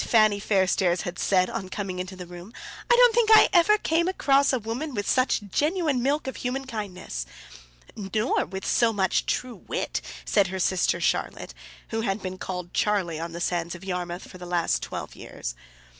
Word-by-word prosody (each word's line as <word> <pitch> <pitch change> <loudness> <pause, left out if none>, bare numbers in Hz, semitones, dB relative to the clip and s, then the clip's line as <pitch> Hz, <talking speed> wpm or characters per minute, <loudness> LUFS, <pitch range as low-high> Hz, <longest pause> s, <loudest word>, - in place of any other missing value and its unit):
Fanny 215 -3 +4
Fairstairs 190 -3 +2
had 175 0 -5
said 185 -2 +3
on 185 - -5
coming 190 -2 -4
into 185 +1 -5
the 180 -1 -8
room. 175 +4 -11 0.4
"I 485 - +7
don't - - +6
think 460 -1 +3
I - - +7
ever 390 +4 +5
came 335 -3 +1
across 280 -6 +3
a 260 - +2
woman 245 +6 -4
with 205 -1 -2
such 255 -4 +2
genuine 305 - +1
milk 285 +4 0
of 265 - -5
human 265 +2 -3
kindness!" 190 - -5 0.7
"Nor 215 +3 0
with 190 +2 -6
so 235 -1 +3
much 190 -3 0
true 250 -2 -2
wit," - - -2 0.2
said 200 -2 +3
her 190 +1 -4
sister 185 0 +1
Charlotte, - - -1 0.4
who 225 0 -2
had 200 -2 -1
been 185 -1 -6
called 180 -2 -5
Charlie 185 -6 0
on 165 0 -5
the 170 - -5
sands 175 0 -1
of 175 - -11
Yarmouth 180 -1 -4
for 185 - -12
the 180 - -8
last 175 -1 +1
twelve - - -6
years. - - -6
200 Hz, 190 wpm, -26 LUFS, 180-260 Hz, 0.7 s, I